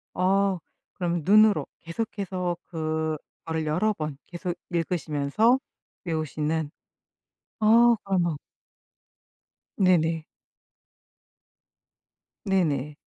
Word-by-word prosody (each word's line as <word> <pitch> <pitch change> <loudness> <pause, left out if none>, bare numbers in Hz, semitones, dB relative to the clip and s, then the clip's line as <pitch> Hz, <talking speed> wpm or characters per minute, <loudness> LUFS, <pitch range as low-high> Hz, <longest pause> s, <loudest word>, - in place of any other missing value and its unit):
어 195 +1 +2 0.4
그러면 175 -2 -1
눈으로 215 +2 +5
계속해서 180 -1 -3
그거를 160 0 -3
여러 180 +8 +2
번 155 -6 -5
계속 175 0 -4 0.2
읽으시면서 170 - +1 0.5
외우시는 155 -1 -2 0.9
아 230 +2 +6
그러면 175 -6 0 1.4
네네. 165 -4 +3 2.2
네네. 150 -8 0
175 Hz, 165 characters per minute, -26 LUFS, 155-195 Hz, 2.2 s, 아